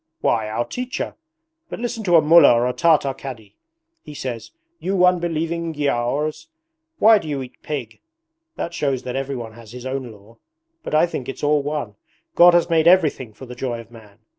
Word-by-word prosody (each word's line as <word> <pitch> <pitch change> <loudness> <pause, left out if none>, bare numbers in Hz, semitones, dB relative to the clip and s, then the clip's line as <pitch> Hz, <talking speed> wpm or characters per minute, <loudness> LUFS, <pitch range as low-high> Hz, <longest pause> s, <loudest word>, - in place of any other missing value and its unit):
'Why, 110 -2 +1
our 115 +2 -2
teacher! 250 0 -5 0.5
But - - -6
listen 235 -1 -4
to 175 -2 +4
a 160 - +6
Mullah 160 -3 +7
or 120 +1 +2
a 125 - -1
Tartar 155 -4 +2
Cadi. 115 -7 -10 0.5
He 150 - -11
says, 120 -6 -5 0.3
"You 185 -1 +2
unbelieving 170 -2 0
Giaours, 145 - -1 0.5
why 220 0 +6
do 165 - -9
you 140 -3 -3
eat 125 - -14
pig?" 135 -7 -6 0.5
That 170 - -5
shows 135 -5 -1
that 125 0 -5
everyone 130 -4 -4
has 115 -1 -14
his 125 0 -9
own 130 -2 -4
law. 105 +2 -18 0.4
But 240 - -3
I 155 - +5
think 135 -7 -6
it's 135 - -7
all 145 0 +3
one. 140 -8 -4 0.4
God 175 0 +7
has 175 - +3
made 165 -1 +2
everything 155 -9 +3
for 110 +5 -12
the 125 - -9
joy 125 -1 -4
of 115 0 -13
man. 105 -3 -16
140 Hz, 190 wpm, -21 LUFS, 120-165 Hz, 0.5 s, Mullah